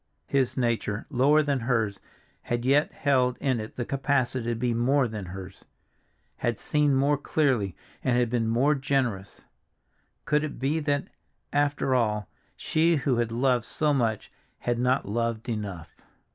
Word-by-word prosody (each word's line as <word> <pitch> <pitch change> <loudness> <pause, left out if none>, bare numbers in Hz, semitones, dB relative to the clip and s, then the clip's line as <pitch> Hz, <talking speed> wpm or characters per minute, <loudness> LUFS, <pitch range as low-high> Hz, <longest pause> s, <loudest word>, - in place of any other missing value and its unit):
His 135 -3 0
nature, 115 -4 -1
lower 145 +4 +4
than 140 -2 0
hers, 115 -4 0 0.4
had 120 0 -3
yet 140 +3 +3
held 130 -3 +1
in 130 -4 0
it 110 0 -7
the 120 - -3
capacity 130 -3 0
to 120 - 0
be 120 +1 0
more 130 +3 +2
than 105 -4 -6
hers—had 95 +4 -8
seen 150 -2 +1
more 140 +2 +3
clearly, 130 - +1 0.3
and 125 -2 +2
had 125 -1 +3
been 115 -2 +1
more 125 +6 +3
generous. 130 -8 -1 0.8
Could 150 0 +2
it 155 - -4
be 145 +5 0
that, 145 -2 -1 0.4
after 145 -2 +1
all, 105 -5 +1 0.3
she 165 +2 +2
who 135 -4 +1
had 120 -1 0
loved 125 -1 +1
so 150 -1 0
much 115 -5 -1 0.3
had 120 -1 -1
not 125 -1 +1
loved 115 +2 -2
enough? 100 -8 -5
125 Hz, 150 wpm, -27 LUFS, 115-140 Hz, 0.8 s, lower